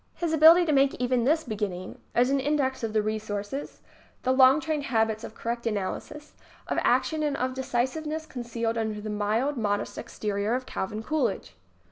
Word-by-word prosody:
His 335 -2 -2
ability 325 +3 +8
to 315 - +1
make 275 -1 +3
even 250 -1 0
this 315 +4 +3
beginning 200 -5 -4 0.2
is 250 +2 +3
an 275 - +2
index 265 -2 0
of 225 - -1
the 215 -1 +1
resources, 215 +4 -4 0.4
the 255 - +2
long 260 +2 +6
trained 310 -2 -2
habits 220 -2 0
of 220 - -8
correct 235 0 -3
analysis, 225 +8 -4 0.3
of - - 0
action 315 -1 +2
and 295 -2 0
of 255 +1 -1
decisiveness 265 +5 -2
con 255 -5 -7
cealed 230 -1 -2
under 220 -2 -2
the 215 0 -5
mild, 220 +7 0
modest 205 -3 -1
exterior 210 +2 -2
of 255 0 -3
Calvin 210 +1 -4
Coolidge. 265 -7 -1
245 Hz, 175 wpm, -27 LUFS, 215-285 Hz, 0.4 s, ability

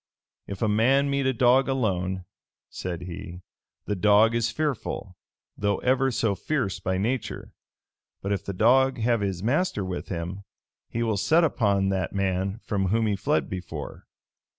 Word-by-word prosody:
[*] - - -68
"If 100 +2 -4
a - - +3
man 130 +7 +3
meet 140 -1 +1
a - - +3
dog 125 +2 +4
alone," 95 -8 -1 0.5
said 90 -2 -5
he, 90 0 -8 0.4
"the 105 - -1
dog 105 +3 +5
is 115 -1 +1
fearful, 125 -8 -3 0.4
though 100 0 0
ever 130 +1 +2
so 115 -4 +1
fierce 100 - -2
by 95 0 -1
nature: 115 +6 -3 0.7
but 100 - -2
if 100 -1 -1
the 100 - -4
dog 130 +7 +4
have 115 -1 +1
his 95 -2 -2
master 130 - 0
with 90 -1 -5
him, 90 +3 -4 0.5
he 115 - -2
will 110 -3 0
set 155 - +3
upon 100 -10 +2
that 95 -3 -1
man 95 +1 0
from 100 -3 -1
whom 110 +4 +2
he 105 -2 +1
fled 135 +10 0
before. 90 -1 -7
105 Hz, 165 wpm, -26 LUFS, 95-125 Hz, 0.7 s, dog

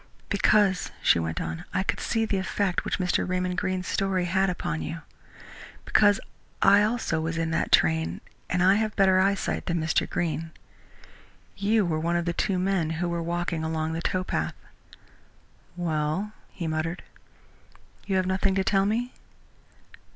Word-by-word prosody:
"Because," 200 -2 +3
she - - +5
went 80 0 -2
on, 80 0 -4
"I 190 - +2
could - - -1
see 225 -1 0
the 200 -3 -1
effect 190 0 -1
which - - -1
Mr. 180 0 0
Raymond 180 0 -1
Greene's 185 -1 -2
story 195 -3 0
had 190 +2 +2
upon 175 -2 -3
you; 165 +1 -5 0.8
because 205 -1 +4 0.4
I, 200 +1 +6
also, 210 -7 0
was 165 +1 -2
in 165 0 -1
that 170 - -1
train, 80 +2 +3 0.3
and 180 0 +1
I 190 +2 +5
have 215 -1 -1
better 190 -2 +4
eyesight 195 +1 0
than 170 -1 0
Mr. 160 0 0
Greene. 165 -1 -2 1.1
You 210 +1 +2
were 160 -2 -1
one 170 +2 0
of 170 -1 0
the 170 - -1
two 190 +2 0
men 185 -3 0
who 175 +1 -1
were 170 0 -2
walking 170 -1 -2
along 160 0 -2
the 165 - -3
towpath." 185 +1 -1 1.2
"Well?" 165 +4 -1 0.2
he 170 - -6
muttered. 160 +2 -2 1.0
"You 195 - 0
have 185 -1 +2
nothing 190 +1 +1
to 195 - +2
tell 195 0 +2
me?" 240 +4 -1
180 Hz, 160 wpm, -26 LUFS, 165-195 Hz, 1.2 s, I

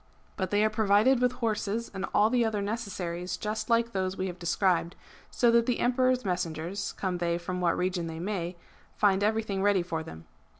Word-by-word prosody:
But 190 -2 -2
they 205 +2 +3
are - - +3
provided 215 +4 +3
with 250 0 +3
horses 230 -2 -2
and 195 0 -3
all 215 +2 +3
the 245 -1 +3
other 220 -2 0
necessaries 185 -5 -4
just 215 +2 -3
like 235 0 +2
those 190 -1 -2
we 185 - -1
have 180 -1 -5
described, 175 0 +1 0.3
so 240 -1 +3
that 235 0 +3
the 245 - +1
Emperor's 255 0 +2
messengers, 180 +1 -2
come 185 -2 -3
they 170 -1 0
from 180 +1 -4
what 170 -1 +2
region 180 -2 -1
they 160 0 -6
may, 180 -2 -3 0.4
find 200 -1 +3
everything 215 -2 0
ready 200 -2 +3
for 165 -2 -3
them. 80 - -10
200 Hz, 195 wpm, -28 LUFS, 180-225 Hz, 0.4 s, they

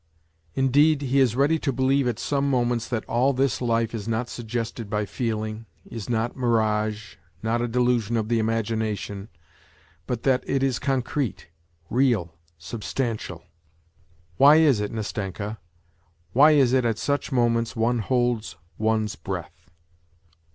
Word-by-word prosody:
Indeed, 145 +3 +3
he 135 +1 +2
is 125 -4 +3
ready 145 +5 +3
to 140 - -1
believe 130 +1 +2
at 120 -3 -1
some 140 +2 0
moments 120 -3 0
that 115 -3 -2
all 130 +4 +2
this 135 -2 0
life 115 -1 0
is 110 -2 -5
not 115 +2 -1
suggested 115 -1 -4
by 105 0 -1
feeling, 110 -1 -3 0.2
is 115 -2 -7
not 115 0 -1
mirage, 110 -4 0 0.3
not 115 +1 0
a 120 - 0
delusion 120 -2 +1
of 110 -1 -1
the 115 0 +1
imagination, 110 -2 -2 0.8
but 120 -2 -3
that 130 -1 +2
it 135 -1 0
is 130 -3 +1
concrete, 130 - -2 0.4
real, 115 -10 +2 0.2
sub 100 +7 -7
stantial! 115 -1 -3 0.9
Why 145 +2 +8
is 150 -8 +5
it, 105 0 -2
Nastenka, 105 -1 -4 0.7
why 150 +5 +7
is 135 -4 +4
it 130 -1 +3
at 115 -2 0
such 145 +4 -1
moments 115 -2 +1
one 115 +1 +1
holds 120 -5 0 0.2
one's 110 -1 0
breath - - -7
115 Hz, 145 wpm, -25 LUFS, 110-130 Hz, 0.9 s, Why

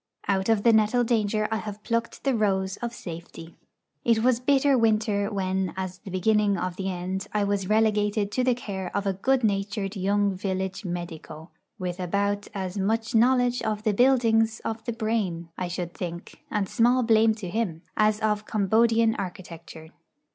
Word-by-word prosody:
Out 195 +1 +1
of 220 -2 +3
the 235 - +5
nettle 220 +3 +3
danger 215 -2 +1
I 220 - +1
have 210 -1 -7
plucked 230 0 -2
the 270 - +2
rose 195 -3 0
of 240 -1 -4
safety. 170 -5 -9 0.5
It 225 -1 +2
was 250 -1 +3
bitter 275 +1 +3
winter 215 -3 +1
when, 190 -2 -1
as 185 -1 -4
the 195 - -10
beginning 200 +2 +2
of 180 0 -3
the 190 +1 -3
end, 185 +1 -4
I 210 -1 +1
was 200 -1 -1
relegated 210 -1 +2
to 255 - 0
the 250 -1 +3
care 195 -6 -5
of 200 - -2
a 195 - +1
good 255 +7 +1
natured 200 -1 -1
young 200 +1 +1
village 190 +1 -3
medico, 170 -2 -6 0.3
with 180 -2 -4
about 200 +3 -1
as 190 0 -3
much 220 +3 0
knowledge 245 +1 +3
of 215 -1 -2
the 215 -2 +2
buildings 225 -2 +3
of 225 0 -3
the 240 - -2
brain, 215 -7 -2
I 180 - -3
should 175 -1 -4
think 170 -1 -7
(and 205 -2 -1
small 245 +3 +3
blame 225 -1 +4
to 210 -4 -7
him), 175 -4 -2
as 215 0 +2
of 215 -1 0
Cambodian 225 +2 +3
architecture. 170 -4 -8
205 Hz, 175 wpm, -26 LUFS, 190-225 Hz, 0.5 s, the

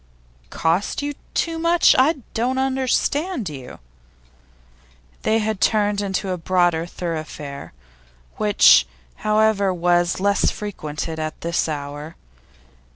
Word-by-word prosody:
'Cost 175 +11 -1
you 290 0 -2 0.2
too 330 -1 -1
much? 335 +1 +4
I 270 +1 +2
don't 250 +3 0
understand 265 - 0
you.' 130 -4 -9 1.4
They 220 - +2
had 215 -2 -2
turned 205 -2 +2
into 195 -1 -2
a 180 - -3
broader 175 -1 +1
thoroughfare, 155 - -6 0.7
which, 210 -1 +5 0.3
however, 215 -2 +2
was 175 0 +1
little 200 +1 +2
frequented 160 -5 -5
at 155 0 -4
this 170 -1 -1
hour. 145 +2 -6
195 Hz, 105 wpm, -21 LUFS, 165-225 Hz, 1.4 s, which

